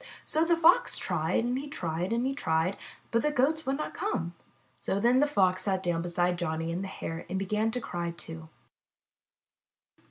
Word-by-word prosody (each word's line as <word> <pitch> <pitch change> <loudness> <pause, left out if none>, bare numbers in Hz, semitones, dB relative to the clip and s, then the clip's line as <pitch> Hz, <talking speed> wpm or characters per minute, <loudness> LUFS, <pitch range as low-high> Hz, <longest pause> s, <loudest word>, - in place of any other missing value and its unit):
So 315 +2 +2
the 335 0 +3
Fox 340 +9 +5
tried 175 +3 0
and 245 +2 0
he 285 - -6
tried 175 - -3
and 235 +2 +1
he 270 - 0
tried, 160 -6 0 0.4
but 230 - +3
the 300 - +1
Goats 295 +3 +1
would 270 +1 +1
not 305 - -4
come. 175 - -2 0.5
Then 235 +6 +3
the 295 - +4
Fox 185 -9 +2
sat 190 -2 0
down 175 -2 0
beside 175 0 0
Johnny 165 -1 -2
and 175 +3 -2
the - - -4
Hare 165 -3 -5
and 190 - -1
began 210 +3 0
to 250 +2 -2
cry, 175 -7 -3
too. 165 -1 -9
195 Hz, 185 wpm, -29 LUFS, 170-265 Hz, 0.5 s, Fox